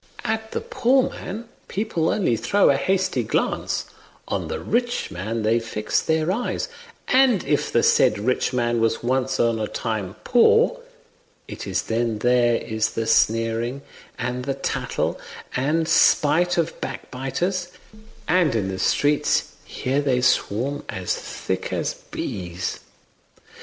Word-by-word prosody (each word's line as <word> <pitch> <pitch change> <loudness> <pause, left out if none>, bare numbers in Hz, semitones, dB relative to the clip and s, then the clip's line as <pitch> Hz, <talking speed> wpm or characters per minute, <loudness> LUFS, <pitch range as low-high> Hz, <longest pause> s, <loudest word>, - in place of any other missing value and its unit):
At 220 0 -2
the - - -2
poor 255 +2 +2
man 220 +5 -7 0.2
people 190 -6 -1
only 180 - +1
throw 125 - +3
a - - +2
hasty 190 +6 +1
glance; - - -1 0.4
on - - -2
the 470 - -3
rich 240 - -1
man 110 +5 -3
they 115 +2 +3
fix 105 -2 -1
their 160 +2 +1
eyes; 235 +6 -2 0.4
and 255 -6 +4
if - - 0
the - - +3
said 105 - +4
rich 125 +5 0
man 120 -2 0
was 115 0 +1
once 130 +2 0
on 115 -1 +2
a 110 - -1
time 110 -5 -3
poor, 450 - +4 0.7
it - - -7
is - - -1
then 115 -1 -1
there 120 +1 +3
is 110 -1 -2
the 115 - -1
sneering 115 +4 +1 0.3
and 125 0 -3
the 135 -1 -1
tattle - - -2 0.4
and 155 +5 +1
spite 165 +5 +4
of 165 -1 -1
backbiters; 175 +8 -3 0.6
and 165 -6 +3
in 100 -4 0
the 95 0 -4
streets 145 +8 +2 0.2
here 135 +3 -1
they 135 -3 +1
swarm 130 +2 +1
as 90 -1 -2
thick - - -4
as - - -1
bees." 90 -2 -5
130 Hz, 140 wpm, -23 LUFS, 115-180 Hz, 0.7 s, and